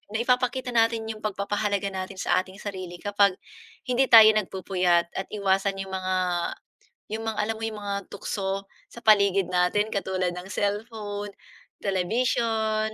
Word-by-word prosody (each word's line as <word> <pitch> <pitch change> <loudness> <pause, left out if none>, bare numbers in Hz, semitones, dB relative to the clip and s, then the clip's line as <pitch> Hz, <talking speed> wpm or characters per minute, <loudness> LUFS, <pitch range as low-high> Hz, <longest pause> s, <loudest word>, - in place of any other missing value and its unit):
naipapakita 250 +1 +1
natin 230 -1 +2
'yong 220 -1 -6
pagpapahalaga 200 -1 -1
natin 190 0 -5
sa - - +2
ating 190 +1 -13
sarili 185 -3 -6
kapag 200 0 +2 0.5
hindi 255 +1 +2
tayo 220 -1 +10
nagpupuyat, 180 -4 +1
at 190 - -4
iwasan 195 -1 +1
'yong 195 0 -6
mga 185 0 -1 1.0
'yong 225 +1 -3
mga, 220 - -2
alam 220 +1 -1
mo 225 - -9
'yong 215 -1 -5
mga 200 0 -2 0.2
tukso 195 -1 -3 0.2
sa 235 - -12
paligid 200 -3 +4
natin 180 +4 +2
katulad 185 -2 -1
ng 180 +1 -7
cellphone, 205 0 -3 0.5
telebisyon, 220 +2 0
205 Hz, 140 wpm, -26 LUFS, 190-220 Hz, 1.0 s, tayo